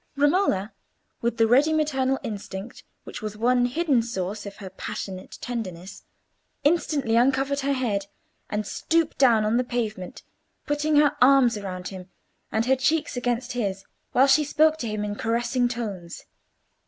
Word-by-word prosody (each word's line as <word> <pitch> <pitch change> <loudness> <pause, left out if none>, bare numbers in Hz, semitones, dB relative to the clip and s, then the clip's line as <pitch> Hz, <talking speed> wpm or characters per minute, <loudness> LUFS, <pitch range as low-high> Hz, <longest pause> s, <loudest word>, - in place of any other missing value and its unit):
Romola, 285 - +2 0.5
with 235 0 -1
the 225 - +5
ready 270 +7 +4
maternal 270 -4 +1
instinct 205 0 -6 0.2
which - - -8
was 215 -1 -5
one 245 +2 +3
hidden 275 -2 +1
source 205 -2 -4
of 200 - -8
her 190 -2 -9
passionate 190 -3 -7
tenderness, 190 -7 -6 0.6
instantly 290 -6 +1
uncovered 270 +3 +2
her 280 0 0
head, 210 -7 -1 0.4
and, 210 0 -2
stooping 330 +8 0
down 235 -5 +5
on 220 +2 +2
the 250 - +2
pavement, 220 -7 -4 0.4
put 290 0 -1
her 300 -1 +3
arms 250 -4 +5
round 185 -2 -5
him, 185 -1 -9 0.4
and 220 +1 +1
her 265 +1 +4
cheeks 300 +3 0
against 245 0 -1
his, 200 -5 -3 0.3
while 260 - +5
she 280 +2 +5
spoke 310 +2 +3
to 240 - -4
him 210 -1 -3
in 205 - -3
caressing 240 +3 0
tones. 205 -8 -6
240 Hz, 155 wpm, -25 LUFS, 210-275 Hz, 0.6 s, the